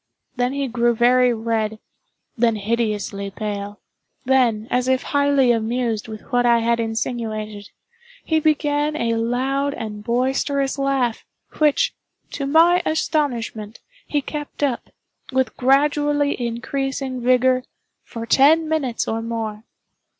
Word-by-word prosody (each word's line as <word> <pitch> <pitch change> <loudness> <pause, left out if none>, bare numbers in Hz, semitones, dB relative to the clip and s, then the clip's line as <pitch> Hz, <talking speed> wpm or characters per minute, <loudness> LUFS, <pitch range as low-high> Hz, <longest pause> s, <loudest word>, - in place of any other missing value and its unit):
Then 245 +1 0
he 280 -1 -1
grew 240 -1 +1
very 250 +1 +4
red—then 225 +1 -3
hideously 210 -2 -2
pale—then, 215 +3 -2
as 250 0 +1
if 260 0 +1
highly 285 -3 +3
amused 230 -1 -1
with 215 -1 -8
what 245 0 +3
I 240 -1 +4
had 235 0 +1
insinuated, 220 -2 -3 0.6
he 320 -1 +2
began 295 -1 +1
a 235 -6 0
loud 260 +5 -1
and 210 -1 -6
boisterous 270 +4 0
laugh, 270 -4 0 0.4
which, 300 -2 +3 0.4
to 275 - -3
my 335 +5 +5
astonishment, 240 -9 -2 0.3
he 290 -2 -1
kept 295 0 -6
up, 265 -4 -1 0.4
with 260 0 0
gradually 290 +2 +2
increasing 265 +2 -3
vigor, 255 +1 +3 0.4
for 230 -1 -7
ten 300 +7 +4
minutes 285 -7 -1
or 225 0 -1
more. 225 -1 -4
245 Hz, 115 wpm, -21 LUFS, 225-280 Hz, 0.6 s, my